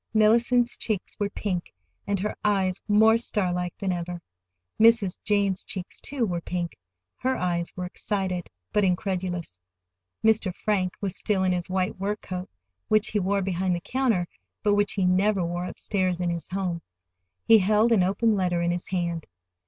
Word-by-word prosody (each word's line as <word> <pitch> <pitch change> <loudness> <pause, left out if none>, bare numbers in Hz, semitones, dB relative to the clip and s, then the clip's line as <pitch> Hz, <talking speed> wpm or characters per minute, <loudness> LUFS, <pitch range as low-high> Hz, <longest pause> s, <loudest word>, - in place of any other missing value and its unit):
Mellicent's 235 +3 +4
cheeks 215 -5 -3
were 205 -1 0
pink, 185 -4 -3 0.4
and 200 -1 0
her 210 - -2
eyes 195 -3 +1
more 220 +2 +5
starlike 180 -6 -1
than 195 -1 -1
ever. 175 0 -3 0.6
Mrs. 225 -4 +4
Jane's 200 -2 +1
cheeks, 185 -2 -6
too, 275 -4 -1
were 175 -4 -2
pink. 175 0 -3 0.4
Her 260 +1 0
eyes 175 -1 -1
were 180 - -3
excited, 185 -1 -3 0.2
but 210 - +3
incredulous. 180 - -1 0.6
Mr. 220 -3 +3
Frank 190 -4 0
was 195 -3 -2
still 195 -3 +1
in 185 - +2
his 180 0 -2
white 185 0 -1
work 205 +2 -2
coat, 185 0 -5 0.4
which 215 -1 +3
he 210 - 0
wore 200 +1 +1
behind 185 -1 0
the - - -2
counter, 235 -9 0 0.4
but 205 -1 +3
which 205 0 +2
he 190 -2 +1
never 190 +1 +3
wore 175 +1 -3
upstairs 185 -1 -1
in 175 -1 0
his 170 -1 -5
home. 180 -3 -2 0.6
He 225 -1 +8
held 215 +4 +3
an 220 -5 +5
open 200 +5 +2
letter 180 -4 +1
in 170 0 +1
his 175 0 -3
hand. 170 -3 -2
190 Hz, 170 wpm, -26 LUFS, 180-210 Hz, 0.6 s, He